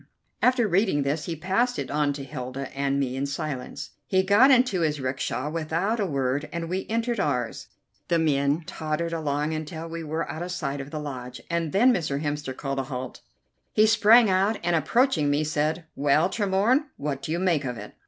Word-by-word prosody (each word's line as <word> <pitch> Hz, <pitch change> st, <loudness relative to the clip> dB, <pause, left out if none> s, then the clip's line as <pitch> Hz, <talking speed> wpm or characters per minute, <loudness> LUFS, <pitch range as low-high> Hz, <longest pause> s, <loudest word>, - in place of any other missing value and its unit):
After 250 Hz, -3 st, +3 dB
reading 190 Hz, -6 st, +2 dB
this 145 Hz, +3 st, -1 dB
he 170 Hz, -, -3 dB
passed 195 Hz, +10 st, 0 dB
it -, -, -4 dB
on 145 Hz, 0 st, +1 dB
to 140 Hz, -1 st, -6 dB
Hilda 135 Hz, -1 st, -6 dB
and 140 Hz, 0 st, 0 dB
me 130 Hz, -2 st, -1 dB
in 135 Hz, +1 st, -1 dB
silence. 140 Hz, -2 st, -5 dB, 0.2 s
He 190 Hz, -1 st, +3 dB
got 205 Hz, +8 st, +6 dB
into 250 Hz, -8 st, +4 dB
his 150 Hz, -2 st, 0 dB
'rickshaw 130 Hz, +2 st, -2 dB
without 165 Hz, +7 st, -1 dB
a 200 Hz, -, +1 dB
word, 140 Hz, 0 st, -1 dB
and 170 Hz, -1 st, -4 dB
we 185 Hz, +2 st, -2 dB
entered 230 Hz, 0 st, -1 dB
ours. 125 Hz, -9 st, -1 dB, 0.4 s
The 170 Hz, -, +2 dB
men 145 Hz, 0 st, +1 dB
tottered 165 Hz, 0 st, -3 dB
along 150 Hz, -1 st, -1 dB
until 160 Hz, +1 st, -5 dB
we 165 Hz, 0 st, -6 dB
were 160 Hz, +2 st, -3 dB
out 160 Hz, -, -6 dB
of 180 Hz, +1 st, -4 dB
sight 140 Hz, -6 st, -3 dB
of 135 Hz, -, -8 dB
the 155 Hz, -, -5 dB
lodge, 125 Hz, -4 st, -6 dB
and 170 Hz, -2 st, -1 dB
then 245 Hz, +6 st, +5 dB
Mr. 145 Hz, -7 st, -1 dB
Hemster 145 Hz, -3 st, -3 dB
called 135 Hz, -1 st, -3 dB
a -, -, 0 dB
halt. 130 Hz, -2 st, -6 dB, 0.5 s
He 215 Hz, -, +5 dB
sprang 225 Hz, +1 st, +6 dB
out, 195 Hz, +3 st, +2 dB
and, 175 Hz, 0 st, +2 dB
approaching 165 Hz, -, +2 dB
me, 145 Hz, +2 st, +2 dB
said: 155 Hz, +2 st, -1 dB
"Well, 145 Hz, +5 st, +3 dB
Tremorne, 210 Hz, +8 st, +2 dB
what 140 Hz, -1 st, -3 dB
do 155 Hz, -, -5 dB
you 165 Hz, -, 0 dB
make 175 Hz, -5 st, +1 dB
of 125 Hz, -3 st, -4 dB
it?" -, -, -9 dB
155 Hz, 200 wpm, -26 LUFS, 140-190 Hz, 0.5 s, got